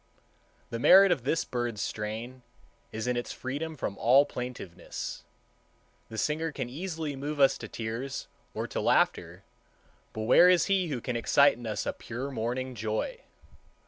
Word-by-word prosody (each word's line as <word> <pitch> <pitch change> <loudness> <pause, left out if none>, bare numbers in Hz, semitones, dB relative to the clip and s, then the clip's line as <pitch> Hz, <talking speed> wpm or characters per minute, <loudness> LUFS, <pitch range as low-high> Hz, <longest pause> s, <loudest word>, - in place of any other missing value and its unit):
The 115 - -3
merit 195 +8 +7
of 130 -8 0
this 160 +4 +1
bird's 120 -3 -3
strain 110 +6 -4 0.5
is 110 0 -4
in 125 0 0
its 120 - -3
freedom 150 +5 -5
from 100 -6 -4
all 130 +5 +6
plaintiveness. 125 -10 -7 0.8
The 110 - -8
singer 155 +5 -1
can 120 - -4
easily 160 -1 -4
move 145 +2 -4
us 135 -1 +5
to - - -7
tears 115 +4 -5 0.3
or - - -2
to - - -3
laughter, - - +1 0.7
but 110 - -4
where 175 +10 +7
is 180 -1 +4
he 190 -2 +1
who 135 -6 -3
can 125 - -3
excite 140 +5 +4
in 120 0 -9
us 105 -1 -2
a - - -1
pure 130 +4 -6
morning 130 +2 -3
joy? 110 -1 -3
125 Hz, 160 wpm, -29 LUFS, 115-145 Hz, 0.8 s, merit